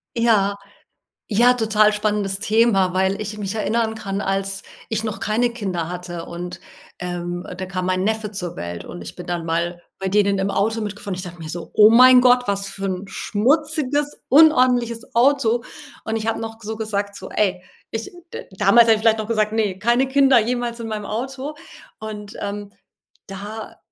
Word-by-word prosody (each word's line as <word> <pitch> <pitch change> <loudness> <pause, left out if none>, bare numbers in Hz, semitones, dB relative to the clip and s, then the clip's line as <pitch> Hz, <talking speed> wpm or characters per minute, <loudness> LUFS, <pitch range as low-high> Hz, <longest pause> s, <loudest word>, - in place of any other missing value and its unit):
Ja. 210 -4 +2 0.8
Ja, 240 +4 +6
total 215 -2 +3
spannendes 205 -2 -1
Thema, 215 -4 +3
weil 190 +2 +1
ich 210 0 -5
mich 200 -1 -4
erinnern 220 +1 0
kann, 195 -2 -4
als 195 0 -2 0.3
ich 220 0 -2
noch 215 - -4
keine 235 +3 +1
Kinder 190 -8 -3
hatte, 175 -1 -6
und, 175 +1 -7 0.4
ähm, 175 0 -4
da 190 - -4
kam 185 -1 -3
mein 185 0 0
Neffe 220 0 -1
zur 180 -4 -5
Welt, 85 0 -5
und 90 - -9
ich 85 - -9
bin 180 - -9
dann 175 -1 -3
mal 170 +1 -2 0.2
bei 195 0 -3
denen 200 0 +2
im 195 +1 0
Auto 220 +3 0
mitgefahren. 205 -2 -5
Und - - -5
ich - - -5
dachte 175 -2 -9
mir 160 - -7
so: 170 +1 -6
„Oh 210 0 +8
mein 255 +2 +8
Gott, 250 0 +5
was 200 0 -1
für 195 0 -6
ein 190 +1 -3
schmutziges, 290 +6 0
unordentliches 250 -6 +4
Auto!” 240 -2 +3 0.4
Und 220 0 -2
ich 220 0 -4
hab 225 - +1
noch 225 0 -6
so 220 0 -5
gesagt 205 -2 -3
so: 190 - -8
„Ey” 185 -3 0 0.3
ich 225 0 -5 0.2
d - - -6
damals 210 +4 +6
hab 225 - +6
ich - - -4
vielleicht 220 0 +3
noch 215 - -3
gesagt: 215 -2 0
„Ne, 210 -4 0
keine 240 +5 +2
Kinder 270 -1 +5
jemals 240 +1 -2
in 230 - -5
meinem 210 -2 -4
Auto!“ 265 +7 -4 0.4
Und, 210 0 -7
ähm, 205 0 -5 0.5
da 205 +3 -8
210 Hz, 185 wpm, -21 LUFS, 195-230 Hz, 0.8 s, Oh